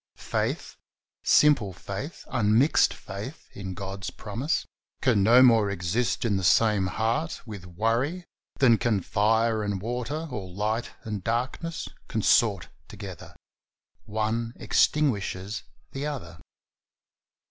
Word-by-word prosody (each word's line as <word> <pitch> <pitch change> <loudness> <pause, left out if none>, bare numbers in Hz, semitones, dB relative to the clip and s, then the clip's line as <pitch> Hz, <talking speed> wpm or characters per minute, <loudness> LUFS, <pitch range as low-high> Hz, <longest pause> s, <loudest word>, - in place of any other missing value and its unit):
Faith - - -3 0.3
— - - -68 0.2
simple 135 -11 +3
faith, 100 - -7
unmixed 120 +6 +4
faith 105 +10 -8
in 95 -2 -6
God's 95 0 -5
promise 120 +9 -2 0.2
— - - -51
can 120 -7 +4
no 120 +6 +7
more 115 -5 +5
exist 100 +7 -1
in 105 -4 +2
the 95 - -3
same 105 0 +4
heart 115 - -1
with 100 -5 -8
worry 115 - -1 0.3
than 120 -5 +5
can 110 -4 +1
fire 110 +3 +2
and 100 -2 -2
water, 125 - -3
or 100 -6 -5
light 105 +5 -2
and 105 -4 -4
darkness, 125 - -2 0.2
consort 110 -2 +2 0.2
together; 100 -5 -9 0.7
one 110 +2 -1
extinguishes 105 -8 +1 0.3
the 140 +2 -3
other. 90 - -6
110 Hz, 120 wpm, -27 LUFS, 100-125 Hz, 0.7 s, no